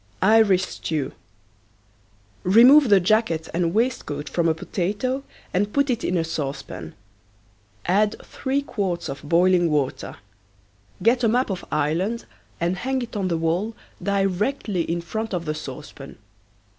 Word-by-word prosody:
IRISH 200 -3 +5
STEW. 150 -7 -3 1.3
Remove 245 +8 +7
the 200 -2 +7
jacket 185 -4 +1
and 170 0 +1
waistcoat 210 - -1
from 170 +1 0
a 160 - +2
potato 205 - -2 0.3
and 205 +3 +1
put 280 -1 +2
it 240 -1 -2
in 180 - 0
a 165 - +1
saucepan. 135 - -5 0.9
Add 205 +4 +2
three 275 +1 -2
quarts 195 -9 -3
of 135 - -6
boiling 175 +2 +3
water. 145 -4 -1 0.9
Get 240 +3 +3
a - - +5
map 245 0 +1
of 185 - -4
Ireland 170 +10 0 0.3
and 175 +2 0
hang 260 +5 -1
it 235 - -9
on 195 -3 -1
the 170 -2 0
wall 175 +7 -1 0.3
directly 200 +1 0
in 170 +1 -1
front 220 +4 -4
of 170 -1 -3
the 155 - -1
saucepan. 140 -1 -9
185 Hz, 140 wpm, -23 LUFS, 165-225 Hz, 1.3 s, Remove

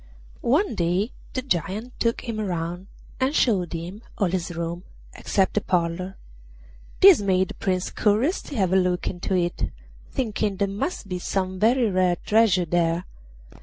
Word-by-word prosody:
One 315 - +3
day 185 +4 0 0.2
the 255 - -2
Giant 215 - -2
took 230 0 +1
him 230 -3 -4
round 175 -1 -3 0.3
and 265 +3 +1
showed 190 - +2
him 175 +6 -6 0.2
all 195 -5 +1
his 180 -2 -1
rooms 170 0 -4 0.3
except 190 -2 0
the 210 - +1
parlour; 180 +1 -1 0.8
this 375 - +9
made 190 -2 +2
the - - -6
Prince 185 -3 -1
curious 225 - +2
to 285 - -9
have 190 -5 +1
a - - +5
look 180 -1 +1
into 190 +1 -2
it, 175 -1 0 0.4
thinking 215 -5 -1
there 200 - +1
must 200 - -3
be 180 -1 -3
some 185 0 -2
very 235 +3 +4
rare 185 -1 +3
treasure 210 -5 +4
there. 170 +1 +1
190 Hz, 160 wpm, -24 LUFS, 175-220 Hz, 0.8 s, this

